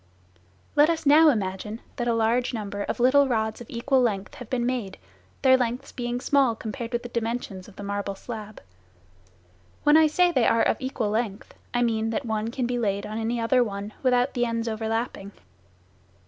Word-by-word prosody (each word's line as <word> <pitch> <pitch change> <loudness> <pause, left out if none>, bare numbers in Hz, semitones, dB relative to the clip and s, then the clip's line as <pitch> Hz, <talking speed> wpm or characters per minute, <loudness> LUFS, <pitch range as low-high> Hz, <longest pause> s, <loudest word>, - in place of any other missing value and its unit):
Let 295 +2 +6
us 325 -2 -1
now 305 +3 +7
imagine 210 -2 -2 0.2
that 240 - -2
a 235 - +2
large 235 +3 +1
number 205 -2 -4
of - - -3
little 275 +3 +5
rods 220 -2 -1
of 240 - -11
equal 260 +3 +1
length 205 -5 -1
have 245 - -10
been 245 -2 0
made, 245 -6 -2 0.5
their 260 -1 +7
lengths 245 -1 -2
being 240 0 -3
small 265 -2 +2
compared 230 +2 -6
with 240 -1 -2
the 240 - -7
dimensions 230 -5 -3
of 200 - -15
the 205 - -8
marble 200 0 -3
slab. 215 -1 -8 1.2
When 295 +1 +6
I 320 -1 +6
say 355 +3 +3
they 255 -8 +2
are 230 - +3
of - - +2
equal 260 -5 -2
length, 215 -2 -3 0.2
I 245 0 +1
mean 225 -1 0
that 230 +4 -2
one 220 0 -1
can 250 +1 -2
be 245 0 -1
laid 200 -3 -1
on 215 +1 -4
any 230 +2 -1
other 245 +2 +3 0.4
without 250 0 +2
the 245 - 0
ends 230 -1 -1
overlapping. 220 -2 -3
235 Hz, 190 wpm, -25 LUFS, 220-250 Hz, 1.2 s, now